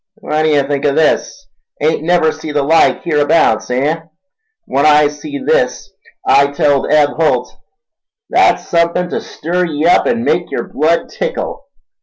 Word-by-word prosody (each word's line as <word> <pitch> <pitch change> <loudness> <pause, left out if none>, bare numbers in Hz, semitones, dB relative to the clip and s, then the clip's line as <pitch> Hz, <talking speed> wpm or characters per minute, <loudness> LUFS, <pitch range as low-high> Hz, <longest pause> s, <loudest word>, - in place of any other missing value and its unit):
"What 155 -8 -3
d'ye 155 -2 +2
think 140 0 -3
o' 140 - 0
this—ain't 155 0 -2
never 165 -1 +2
see 155 0 -8
the 145 -1 0
like 160 +4 +2
hereabouts, 145 -8 +1
eh? 140 +6 0 0.7
When 140 +1 -1
I 150 -1 +5
see 285 - -8
this 475 - -1 0.3
I 140 0 +4
telled 140 -1 0
Eb 150 -1 +4
Holt, 160 +1 -1 0.7
'That's - - +2
suthin' 170 +1 0
ta - - -2
stir 180 +3 -3
ye 155 -2 -3
up 175 - +3
an' 235 -1 0
make 175 -7 0
yer - - -3
blood 160 +4 -1
tickle! - - -5
155 Hz, 150 wpm, -14 LUFS, 145-170 Hz, 0.7 s, I